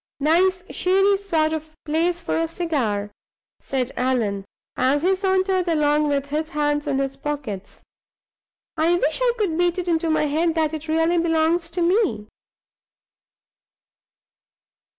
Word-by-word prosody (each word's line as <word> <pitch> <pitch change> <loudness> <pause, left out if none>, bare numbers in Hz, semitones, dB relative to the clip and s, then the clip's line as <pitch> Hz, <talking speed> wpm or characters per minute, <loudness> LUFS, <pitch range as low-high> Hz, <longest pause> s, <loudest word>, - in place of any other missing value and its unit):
"Nice 360 +5 +2
shady 390 +2 +3
sort 325 -6 0
of 315 0 -6
place 335 +3 0
for 340 - -3
a 330 0 0
cigar," 255 - -2 0.5
said 260 -1 -3
Allan, 225 -6 -1 0.3
as 275 +4 +1
he 375 +2 +3
sauntered 380 -1 +1
along 300 -2 +2
with 280 -1 0
his 305 +2 -3
hands 295 -2 -1
in 280 -2 0
his 270 0 -2
pockets 275 -9 -6 0.9
"I 325 +2 +3
wish 320 +1 0
I - - +3
could 395 -8 0
beat 350 0 +2
it 360 -1 -3
into 330 -1 +1
my 315 -1 +2
head 320 +3 0
that 315 -1 0
it 315 0 -6
really 325 +2 +2
belongs 330 0 +1
to 350 0 -1
me." 345 - +1
320 Hz, 140 wpm, -22 LUFS, 290-350 Hz, 0.9 s, shady